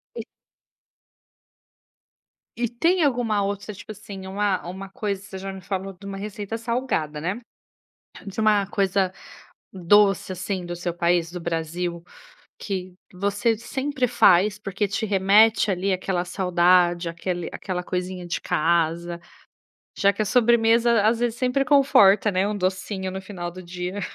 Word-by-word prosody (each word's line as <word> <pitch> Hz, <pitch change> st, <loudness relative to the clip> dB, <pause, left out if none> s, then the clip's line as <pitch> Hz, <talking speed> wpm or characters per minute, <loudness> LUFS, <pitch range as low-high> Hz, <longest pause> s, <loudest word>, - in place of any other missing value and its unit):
E -, -, -6 dB, 2.3 s
E 240 Hz, -, +1 dB
tem 335 Hz, +10 st, +1 dB
alguma 235 Hz, -7 st, +1 dB
outra 200 Hz, +1 st, -3 dB
tipo 210 Hz, +1 st, -10 dB
assim, 200 Hz, -2 st, -9 dB
uma 195 Hz, -1 st, -1 dB
uma 190 Hz, +2 st, -7 dB
coisa 200 Hz, -3 st, -3 dB
que 205 Hz, -, -13 dB
você 190 Hz, -2 st, -8 dB
já 195 Hz, 0 st, -6 dB
me 190 Hz, -, -9 dB
falou 190 Hz, +1 st, -4 dB
de 200 Hz, +2 st, -12 dB
uma 195 Hz, 0 st, -5 dB
receita 210 Hz, +2 st, -5 dB
salgada, 230 Hz, -, -2 dB
né? 185 Hz, +7 st, -2 dB, 0.9 s
De 195 Hz, +2 st, -5 dB
uma 210 Hz, -2 st, +3 dB
coisa 195 Hz, -2 st, +1 dB, 0.6 s
doce 195 Hz, +1 st, +3 dB
assim 185 Hz, 0 st, -4 dB
do 175 Hz, 0 st, -5 dB
seu 175 Hz, 0 st, -4 dB
país, 170 Hz, -1 st, +1 dB
do 180 Hz, -, -6 dB
Brasil, 170 Hz, +1 st, -3 dB, 0.6 s
que 185 Hz, -2 st, -4 dB, 0.2 s
você 205 Hz, +4 st, 0 dB
sempre 265 Hz, +2 st, -2 dB
faz 200 Hz, 0 st, +4 dB
porque 200 Hz, 0 st, -2 dB
te 200 Hz, +3 st, -2 dB
remete 210 Hz, +3 st, +4 dB
ali 190 Hz, +1 st, 0 dB
aquela 180 Hz, -1 st, -2 dB
saudade 175 Hz, -1 st, +2 dB
aquele 175 Hz, +1 st, -4 dB
aquela 180 Hz, -2 st, -4 dB
coisinha 180 Hz, 0 st, -4 dB
de 175 Hz, -, -2 dB
casa, 170 Hz, +1 st, 0 dB, 0.8 s
já 200 Hz, 0 st, +3 dB
que 200 Hz, -, -8 dB
a -, -, 0 dB
sobremesa 235 Hz, 0 st, +4 dB
às 230 Hz, +1 st, +2 dB
vezes 240 Hz, -1 st, -1 dB
sempre 255 Hz, +2 st, +1 dB
conforta, 220 Hz, -7 st, +5 dB
né, 190 Hz, +2 st, +1 dB
um 210 Hz, -, -2 dB
docinho 190 Hz, +1 st, -2 dB
no 190 Hz, -, -6 dB
final 180 Hz, -3 st, -6 dB
do 185 Hz, +1 st, -10 dB
dia. 180 Hz, +3 st, -5 dB
195 Hz, 150 wpm, -24 LUFS, 180-215 Hz, 2.3 s, conforta